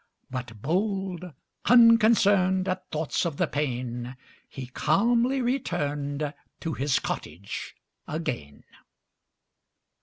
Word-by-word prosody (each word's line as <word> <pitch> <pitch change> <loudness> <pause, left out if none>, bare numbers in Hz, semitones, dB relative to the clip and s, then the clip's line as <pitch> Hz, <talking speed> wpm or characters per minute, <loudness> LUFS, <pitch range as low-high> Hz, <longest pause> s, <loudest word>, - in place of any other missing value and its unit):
But 125 -5 -6
bold, 190 +2 -1 0.4
unconcern'd 215 -6 +5
At 185 -1 -3
thoughts 155 0 -1
of 165 -5 -2
the - - +2
pain, 125 -3 -3 0.3
He 135 - -7
calmly 235 - +2
return'd 150 - -1 0.3
To 165 - -2
his 135 0 +1
cottage 90 +6 -5 0.3
again. 120 - -4
160 Hz, 90 wpm, -27 LUFS, 135-200 Hz, 0.4 s, unconcern'd